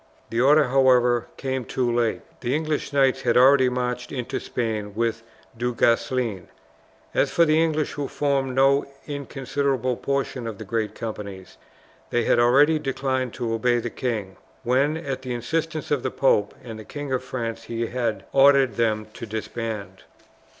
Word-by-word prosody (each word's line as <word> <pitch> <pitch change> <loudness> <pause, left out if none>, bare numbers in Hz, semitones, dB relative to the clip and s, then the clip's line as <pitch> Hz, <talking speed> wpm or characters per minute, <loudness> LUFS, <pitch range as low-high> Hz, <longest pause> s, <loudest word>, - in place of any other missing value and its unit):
The 115 +1 +1
order, 145 +1 +5
however, 125 -2 +4
came 130 -1 -2
too 120 0 -1
late. 120 -2 0 0.2
The 125 +3 -1
English 155 -2 -2
knights 135 -1 +3
had 120 -2 +2
already 130 0 +6
marched 125 0 -3
into 125 -4 -3
Spain 110 -4 -3
with 115 0 -1 0.3
Du 120 +1 -2
Guesclin. 115 -4 +1 0.7
As - - +2
for 170 - +4
the 155 0 +3
English 155 -2 0
who 145 -1 -4
formed 140 -2 -1
no 135 +1 +4 0.2
inconsiderable 135 -3 -2
portion 135 -3 -2
of 110 -3 -5
the 110 - -8
great 110 0 -2
companies, 100 -4 -7 0.5
they 120 - +1
had 120 - +3
already 145 +6 +5
declined 130 -3 -2
to 115 -2 -2
obey 120 +2 +2
the 120 0 -3
king, 110 -7 -3 0.3
when, 135 +5 +2
at 135 -5 -4
the 125 -2 -4
insistence 155 +6 -3
of 145 -3 +2
the 130 - -1
pope 105 -6 +2
and 115 -3 -8
the - - -8
King 145 +3 -5
of 130 0 -1
France, 115 -3 -4
he 115 0 -2
had 120 -2 -2
ordered 135 -4 +5
them 110 -2 +1
to 115 - -8
disband. 110 -1 -5
125 Hz, 165 wpm, -24 LUFS, 115-135 Hz, 0.7 s, already